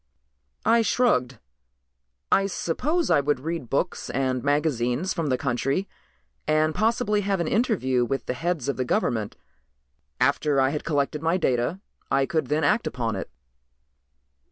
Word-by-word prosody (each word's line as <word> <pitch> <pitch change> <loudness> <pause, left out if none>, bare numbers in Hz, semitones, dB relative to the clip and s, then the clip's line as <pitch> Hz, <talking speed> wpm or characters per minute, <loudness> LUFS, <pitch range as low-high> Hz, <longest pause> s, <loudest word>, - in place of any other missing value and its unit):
I 230 +1 +5
shrugged. 165 - +1 0.9
"I 195 0 +4
suppose 290 - -1
I 160 - +5
would 145 -1 0
read 160 -5 -4
books 155 +6 -1
and 130 -2 -1
magazines 145 +1 0
from 165 -4 -2
the 130 -2 +1
country 135 +9 -1 0.6
and 155 +1 +2
possibly 220 0 +1
have 195 -1 0
an 170 - -1
interview 175 - +1
with 130 0 -2
the - - -2
heads 165 -1 -2
of 140 - -1
the 130 - 0
government. 110 -4 -1 0.8
After 140 +2 +2
I 130 0 +4
had 150 - -3
collected 145 -1 0
my 165 +3 +2
data 135 +3 0 0.3
I 135 0 +2
could 155 -2 -1
then 150 +4 0
act 210 +11 +2
upon 115 -3 -2
it." 95 - -5
150 Hz, 150 wpm, -25 LUFS, 130-185 Hz, 0.9 s, I